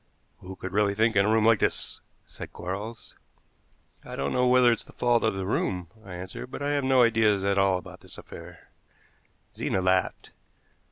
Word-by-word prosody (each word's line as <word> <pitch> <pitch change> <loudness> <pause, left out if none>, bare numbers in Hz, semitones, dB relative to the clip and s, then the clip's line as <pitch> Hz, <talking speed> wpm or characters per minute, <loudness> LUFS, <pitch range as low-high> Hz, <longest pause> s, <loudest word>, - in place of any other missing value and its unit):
"Who 95 +1 -9
could 95 0 -7
really 100 0 +2
think 110 +1 +2
in 100 +1 +4
a - - +2
room 110 0 +3
like 115 -2 +5
this?" - - -2 0.2
said - - -10
Quarles. 105 +5 -7 0.9
"I - - -8
don't 70 - -2
know 125 0 +2
whether 125 -1 +5
it's 115 - -1
the - - -17
fault 120 -1 +1
of 110 -3 +1
the 95 -1 -3
room," 90 -3 -2
I 95 -4 -9
answered, 95 +7 -7
"but 140 - -6
I 145 - 0
have 145 -1 0
no 130 -1 +4
ideas 110 -4 +3
at 100 0 +1
all 95 -1 +3
about 90 - -11
this - - -12
affair." - - -12 0.9
Zena - - -1
laughed. 95 -1 0
105 Hz, 190 wpm, -26 LUFS, 95-115 Hz, 0.9 s, like